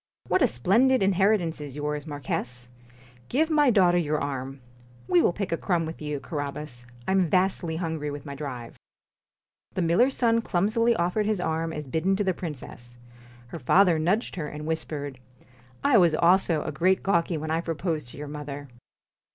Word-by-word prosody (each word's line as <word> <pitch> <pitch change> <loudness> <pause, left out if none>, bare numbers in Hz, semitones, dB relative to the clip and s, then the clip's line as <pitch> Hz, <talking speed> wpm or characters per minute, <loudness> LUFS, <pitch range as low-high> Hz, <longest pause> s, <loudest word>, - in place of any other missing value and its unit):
'What - - +2
a - - +6
splendid 220 - +3
inheritance 190 -4 +2
is 145 -3 -7
yours, 150 0 -3
Marquis! 125 -4 -4 0.6
Give 315 +5 +1
my 295 -3 +4
daughter 180 -6 +4
your 155 -2 0
arm. 135 -1 -4 0.5
We 175 -1 +4
will - - +3
pick 200 +2 -4
a 165 - +1
crumb 175 -3 0
with 160 0 -7
you, 150 -1 -3
Carabas. 140 -3 -6 0.2
I - - +1
'm 190 -3 +3
vastly 180 -3 +1
hungry 160 -3 -3
with 145 0 -7
my 140 - -6
drive.' 135 -5 -7 1.0
The 185 - 0
miller's 230 +11 +3
son 230 -1 +3
clumsily 225 +5 +1
offered 190 +3 0
his 215 -3 0
arm 165 -1 -1
as 150 -2 -6
bidden 160 +8 +1
to 205 - 0
the 190 -2 +1
princess. 125 -7 -8 0.5
Her 165 - -7
father 175 +5 +4
nudged 185 +7 0
her, 155 -3 -3
and 150 +1 -7
whispered: 150 -4 -4 0.3
' 125 0 -27
I 280 -5 +5
also 170 -1 +4
was - - -6
a - - -1
great 185 +6 +2
gawky 170 -3 +1
when 155 +1 -4
I 165 +1 +1
proposed 160 -5 -3
to - - -12
your 150 +1 -6
mother.' 145 -1 -7
160 Hz, 180 wpm, -26 LUFS, 145-190 Hz, 1.0 s, a